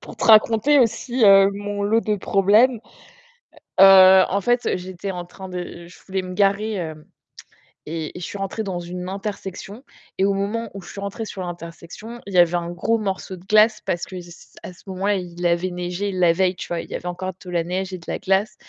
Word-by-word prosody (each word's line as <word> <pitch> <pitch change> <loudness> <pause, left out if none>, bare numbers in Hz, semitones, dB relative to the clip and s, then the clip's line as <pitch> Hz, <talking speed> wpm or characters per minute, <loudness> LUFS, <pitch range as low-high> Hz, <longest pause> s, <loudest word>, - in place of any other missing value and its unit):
pour - - -11
te - - -4
raconter 225 +6 +5
aussi, 240 0 +1
heu, 195 -1 +7
mon 205 0 -4
lot 220 +3 +2
de 210 -2 0
problèmes. 210 +6 +3 1.0
Heu, 190 -1 +9
en 200 - 0
fait, 240 +2 0
j'étais 185 +1 -6
en 175 -1 -6
train 190 +1 -11
de 175 -1 -7
je 180 - -16
voulais 190 0 -2
me 185 0 -7
garer, 200 +1 +1
heu 155 -2 -7 0.8
et 160 +1 -5
et - - -8
je - - -4
suis 200 - -7
rentrée 195 +3 -4
dans 185 -3 -4
une 180 +1 -6
intersection. 200 +3 -7 0.3
Et 190 - +1
au 200 0 +2
moment 210 +3 -3
où 195 - -8
je - - -13
suis 200 - -8
rentrée 200 +3 -5
sur 195 -3 -7
l'intersection, 175 +6 -9
il 200 - -8
y - - +1
avait 175 0 +5
un 170 0 -2
gros 225 +6 0
morceau 195 -2 -4
de 175 - -15
glace, 215 +1 +4
parce 175 +1 -2
que 185 -1 -8
c 175 0 -14
c - - -15 0.2
à - - -7
ce 180 - -19
moment-là, 195 +2 -1
il 175 -1 -6
avait 175 +2 +1
neigé 180 +3 -4
la 175 -2 +3
veille, 185 +1 +1
tu - - -7
vois? 170 -1 -2
Il - - -8
y - - -5
avait 180 - -6
encore 185 +1 -4
de 180 - -10
la 170 -2 -1
neige 185 +2 -3
et 185 - -5
de 170 - -16
la - - -3
glace. 195 +3 0
190 Hz, 230 wpm, -22 LUFS, 180-205 Hz, 1.0 s, Heu